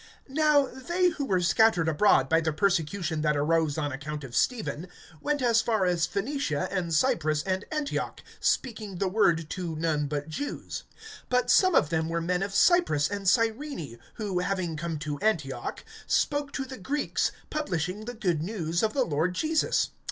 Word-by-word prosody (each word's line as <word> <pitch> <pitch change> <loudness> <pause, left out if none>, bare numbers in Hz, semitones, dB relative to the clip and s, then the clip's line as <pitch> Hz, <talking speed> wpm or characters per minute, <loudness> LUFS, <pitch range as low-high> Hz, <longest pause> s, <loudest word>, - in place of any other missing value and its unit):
(19)Now 285 -3 +2
they 360 +1 +3
who 300 -4 -4
were 185 -7 +1
scattered 180 -2 +3
abroad 160 -4 +4
by 165 +3 +3
the 160 -1 0
persecution 170 -1 0
that 150 -1 +1
arose 160 0 +1
on 145 -2 -1
account 145 +2 -5
of 125 -3 -8
Stephen, 205 - 0 0.3
went 295 -2 -1
as 230 -2 +4
far 220 -4 +1
as 175 -2 +1
Phoenicia, 195 - -2
and 180 -4 -2
Cyprus, 155 -1 +2
and 190 +2 -2
Antioch, 300 -2 -3 0.2
speaking 215 -6 -1
the 195 - 0
word 170 -5 +2
to 175 -4 -4
none 155 -2 0
but 145 0 -3
Jews. 225 - -5 0.4
(20)But 250 0 +2
some 370 -2 +5
of 150 - +4
them 160 -1 0
were 170 0 -1
men 180 +2 -1
of 195 0 -3
Cyprus 275 - +4
and 200 -2 0
Cyrene, 225 - -1 0.2
who, 200 -5 -2
having 180 -3 -1
come 165 +1 -3
to 150 -1 -4
Antioch, 155 - -2 0.2
spoke 290 -1 +1
to 270 - -2
the 260 -2 -9
Greeks, 285 +9 -1 0.2
publishing 190 - -2
the 245 +1 -6
good 180 -9 0
news 170 -3 -2
of 220 -1 +1
the 265 -3 +2
Lord 160 +4 0
Jesus. 315 - +1
185 Hz, 175 wpm, -27 LUFS, 160-240 Hz, 0.4 s, some